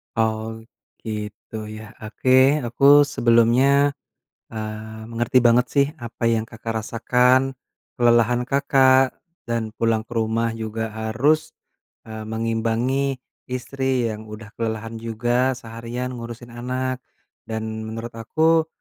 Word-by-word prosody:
Oh, 110 Hz, 0 st, -1 dB, 0.4 s
gitu, 105 Hz, 0 st, -6 dB
ya. 110 Hz, 0 st, -9 dB
Oke, 130 Hz, +6 st, +3 dB
aku 140 Hz, +5 st, +6 dB
sebelumnya, 130 Hz, +4 st, +4 dB, 0.6 s
eee, 110 Hz, 0 st, -6 dB
mengerti 120 Hz, +3 st, +2 dB
banget, 120 Hz, +1 st, +4 dB
sih, 140 Hz, -1 st, +4 dB
apa 115 Hz, -2 st, -6 dB
yang 110 Hz, -1 st, +1 dB
Kakak 115 Hz, 0 st, -6 dB
rasakan, 125 Hz, +3 st, +2 dB, 0.4 s
kelelahan 120 Hz, 0 st, +3 dB
Kakak 135 Hz, -1 st, +3 dB, 0.3 s
dan 115 Hz, -2 st, -2 dB
pulang 115 Hz, -1 st, +1 dB
ke 120 Hz, -, -16 dB
rumah 115 Hz, +1 st, 0 dB
juga 110 Hz, 0 st, -4 dB
harus, 135 Hz, +9 st, 0 dB, 0.5 s
eee, 110 Hz, -1 st, -7 dB
mengimbangi 115 Hz, +4 st, 0 dB, 0.3 s
istri 130 Hz, -1 st, -1 dB
yang 110 Hz, 0 st, -9 dB
udah 105 Hz, 0 st, -10 dB
kelelahan 115 Hz, 0 st, -3 dB
juga 120 Hz, +3 st, 0 dB
seharian 120 Hz, +2 st, -6 dB
ngurusin 120 Hz, 0 st, -8 dB
anak. 130 Hz, +1 st, -3 dB, 0.5 s
Dan 110 Hz, 0 st, -4 dB
menurut 115 Hz, +1 st, -6 dB
aku, 160 Hz, +8 st, +2 dB
115 Hz, 110 wpm, -22 LUFS, 110-130 Hz, 0.6 s, aku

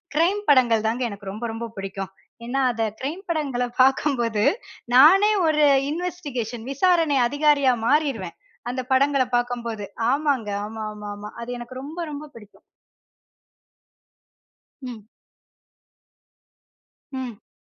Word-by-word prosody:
Crime 370 Hz, +6 st, +2 dB
படங்கள் 240 Hz, -6 st, +4 dB
தாங்க 240 Hz, +3 st, -1 dB
எனக்கு 200 Hz, -2 st, -7 dB
ரொம்ப, 215 Hz, +4 st, -5 dB
ரொம்ப 230 Hz, +1 st, -5 dB
பிடிக்கும். 195 Hz, 0 st, -5 dB, 0.3 s
ஏன்னா, 265 Hz, +3 st, -1 dB
அத 230 Hz, -1 st, -2 dB, 0.2 s
கிரைம் 310 Hz, +8 st, -4 dB
படங்கள்ல 285 Hz, -7 st, -1 dB, 0.2 s
பாக்கும்போது 255 Hz, -5 st, +2 dB, 0.5 s
நானே 380 Hz, +11 st, +7 dB, 0.2 s
ஒரு 305 Hz, -1 st, +3 dB, 0.3 s
இன்வெஸ்டிகேஷன் 290 Hz, -10 st, -4 dB
விசாரணை 330 Hz, -1 st, +3 dB
அதிகாரியா 285 Hz, -1 st, +3 dB
மாறிடுவேன். 275 Hz, -, 0 dB, 0.3 s
அந்த 255 Hz, +1 st, -3 dB
படங்கள்ல 275 Hz, 0 st, +3 dB
பாக்கும்போது, 235 Hz, -3 st, -3 dB, 0.3 s
ஆமாங்க. 280 Hz, -6 st, 0 dB, 0.2 s
ஆமா, 220 Hz, 0 st, -6 dB
ஆமா, 210 Hz, 0 st, -8 dB
ஆமா. 210 Hz, +1 st, -9 dB
அது 235 Hz, -, -7 dB
எனக்கு 240 Hz, +2 st, -9 dB
ரொம்ப, 305 Hz, +5 st, -8 dB
ரொம்ப 290 Hz, +1 st, -6 dB
பிடிக்கும். 210 Hz, -3 st, -15 dB, 2.2 s
ம். 245 Hz, -5 st, -8 dB, 2.1 s
ம். 250 Hz, -5 st, -7 dB
255 Hz, 110 wpm, -23 LUFS, 225-295 Hz, 2.2 s, நானே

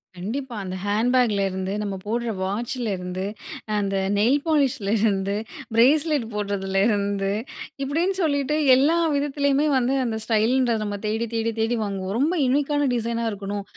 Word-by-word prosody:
கண்டிப்பா. 235 Hz, +7 st, -5 dB
அந்த 185 Hz, -1 st, -5 dB
ஹேண்ட்பேக்ல 225 Hz, 0 st, +2 dB
இருந்து 190 Hz, +1 st, -3 dB
நம்ம 200 Hz, -2 st, -3 dB
போடுற 235 Hz, +2 st, -1 dB
வாட்சிலருந்து 195 Hz, -3 st, -3 dB, 0.5 s
அந்த 195 Hz, -1 st, -1 dB, 0.2 s
நெயில் 250 Hz, +8 st, +3 dB
பாலிஷ்லருந்து, 220 Hz, -9 st, +1 dB, 0.4 s
பிரேஸ்லெட் 285 Hz, +3 st, +3 dB
போடுறதுல 200 Hz, -2 st, -1 dB
இருந்து 200 Hz, -2 st, 0 dB, 0.5 s
இப்படின்னு 330 Hz, +8 st, 0 dB
சொல்லிட்டு 285 Hz, -2 st, +1 dB, 0.2 s
எல்லா 290 Hz, +6 st, +3 dB, 0.2 s
விதத்திலயுமே 285 Hz, +1 st, +1 dB
வந்து 255 Hz, +1 st, +1 dB
அந்த 220 Hz, -2 st, -2 dB
ஸ்டைலுன்ற 235 Hz, +2 st, +2 dB
நம்ம 205 Hz, -1 st, -3 dB
தேடி, 220 Hz, +2 st, 0 dB
தேடி, 225 Hz, 0 st, 0 dB
தேடி 225 Hz, +2 st, +1 dB
வாங்குவோம். 195 Hz, 0 st, -3 dB
ரொம்ப 310 Hz, +6 st, +2 dB
யுனீக்கான 290 Hz, +2 st, +1 dB
டிசைனா 235 Hz, 0 st, -1 dB
இருக்கணும். 200 Hz, 0 st, -4 dB
230 Hz, 125 wpm, -24 LUFS, 200-270 Hz, 0.5 s, நெயில்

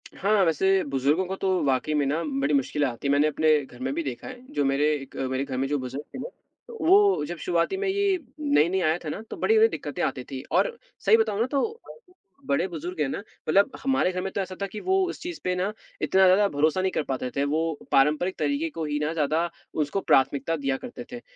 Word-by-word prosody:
हाँ, 200 Hz, 0 st, +2 dB
वैसे 190 Hz, +4 st, +2 dB
बुजुर्गों 140 Hz, +7 st, +1 dB
को 190 Hz, -, -3 dB
तो 190 Hz, 0 st, -1 dB, 0.2 s
वाक़ई 135 Hz, +3 st, +1 dB
में 145 Hz, -2 st, +2 dB
ना 155 Hz, +5 st, 0 dB, 0.2 s
बड़ी 145 Hz, +2 st, +1 dB
मुश्किलें 140 Hz, +1 st, +1 dB
आती 125 Hz, +3 st, -4 dB
हैं। -, -, +2 dB
मैंने 145 Hz, +2 st, +4 dB
अपने 155 Hz, 0 st, +3 dB
घर 125 Hz, -1 st, -15 dB
में 130 Hz, +1 st, -2 dB
भी 170 Hz, -, -2 dB
देखा 130 Hz, -4 st, -6 dB
है, 255 Hz, -1 st, -8 dB
जो 145 Hz, -, +1 dB
मेरे 145 Hz, +3 st, +2 dB
एक 135 Hz, -2 st, -9 dB, 0.2 s
मेरे 130 Hz, +1 st, 0 dB
घर 130 Hz, -2 st, -4 dB
में 135 Hz, +1 st, 0 dB
जो 145 Hz, 0 st, 0 dB
बुजुर्ग 130 Hz, +3 st, -6 dB
हैं 260 Hz, -, -5 dB
ना, -, -, -5 dB, 0.5 s
वो 390 Hz, -, +5 dB
जब 175 Hz, -, -5 dB
शुरुआती 170 Hz, -, 0 dB
में 400 Hz, 0 st, -1 dB
ये 395 Hz, -1 st, +2 dB, 0.2 s
नई-नई 190 Hz, -, +2 dB
आया 160 Hz, +1 st, +2 dB
था -, -, -2 dB
ना 210 Hz, -, -5 dB
तो -, -, -6 dB
बड़ी-बड़ी 445 Hz, 0 st, +5 dB
दिक्कतें -, -, -4 dB
आती -, -, -1 dB
थी -, -, -4 dB
और 475 Hz, -2 st, +2 dB, 0.3 s
सही 445 Hz, -, +7 dB
बताऊँ 215 Hz, -, 0 dB
ना 230 Hz, -, +3 dB
तो 440 Hz, -, -1 dB, 0.7 s
बड़े 270 Hz, -8 st, +1 dB
बुजुर्ग 170 Hz, 0 st, -6 dB
हैं 140 Hz, -, +2 dB
ना -, -, -3 dB
मतलब 200 Hz, +3 st, 0 dB
हमारे 270 Hz, -8 st, +2 dB
घर 185 Hz, 0 st, -3 dB
में 190 Hz, 0 st, -4 dB
तो 200 Hz, -, -1 dB
ऐसा 185 Hz, 0 st, -5 dB
था -, -, +1 dB
कि 210 Hz, +2 st, -7 dB
वो 380 Hz, +1 st, +2 dB
उस -, -, -6 dB
चीज़ 350 Hz, -1 st, -6 dB
पे 180 Hz, 0 st, 0 dB
ना 190 Hz, +3 st, -1 dB, 0.3 s
इतना 190 Hz, 0 st, +3 dB
ज़्यादा 195 Hz, +3 st, +5 dB
भरोसा 155 Hz, +5 st, +1 dB
नहीं 190 Hz, 0 st, 0 dB
कर 155 Hz, -, -1 dB
पाते 130 Hz, -2 st, -3 dB
थे, 140 Hz, -, +1 dB
वो 155 Hz, +1 st, -1 dB
पारंपरिक 150 Hz, +7 st, +3 dB
तरीके 295 Hz, +3 st, 0 dB
को 165 Hz, -, -4 dB
ही 150 Hz, 0 st, -1 dB
ना 150 Hz, +1 st, -1 dB
ज़्यादा 160 Hz, +2 st, 0 dB, 0.3 s
उसको 190 Hz, +7 st, -3 dB
प्राथमिकता 140 Hz, +4 st, +2 dB
दिया 135 Hz, -2 st, -1 dB
करते 245 Hz, 0 st, -8 dB
थे। 240 Hz, 0 st, -7 dB
170 Hz, 235 wpm, -26 LUFS, 145-210 Hz, 0.7 s, सही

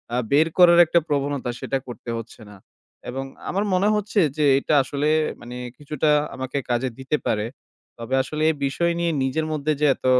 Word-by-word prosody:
আ -, -, +1 dB
বের 155 Hz, +3 st, +5 dB
করার 175 Hz, -1 st, +7 dB
একটা 170 Hz, +1 st, +3 dB
প্রবণতা, 140 Hz, -3 st, -1 dB
সেটা 135 Hz, -, -2 dB
করতে 120 Hz, 0 st, -9 dB
হচ্ছে 115 Hz, +1 st, -11 dB
না। 100 Hz, -, -13 dB, 0.5 s
এবং 135 Hz, +2 st, -4 dB, 0.2 s
আমার 200 Hz, +3 st, 0 dB
মনে 190 Hz, +3 st, +3 dB
হচ্ছে 210 Hz, 0 st, 0 dB, 0.2 s
যে, 150 Hz, -, +2 dB
এটা 150 Hz, -, -1 dB
আসলে, 145 Hz, +3 st, -1 dB, 0.3 s
মানে, 120 Hz, +1 st, -9 dB, 0.2 s
কিছুটা 150 Hz, 0 st, -1 dB, 0.3 s
আমাকে 130 Hz, +1 st, -4 dB
কাজে 120 Hz, +2 st, 0 dB
দিতে 140 Hz, +3 st, -1 dB
পারে। 105 Hz, 0 st, 0 dB, 0.5 s
তবে 115 Hz, +3 st, -2 dB
আসলে 155 Hz, +2 st, -5 dB
এই 160 Hz, -, -6 dB
বিষয় 170 Hz, +5 st, 0 dB
নিয়ে 170 Hz, -1 st, +1 dB
নিজের 155 Hz, +4 st, -1 dB
মধ্যে 155 Hz, 0 st, -1 dB
যে -, -, +4 dB
এত -, -, -14 dB
145 Hz, 180 wpm, -23 LUFS, 130-160 Hz, 0.5 s, করার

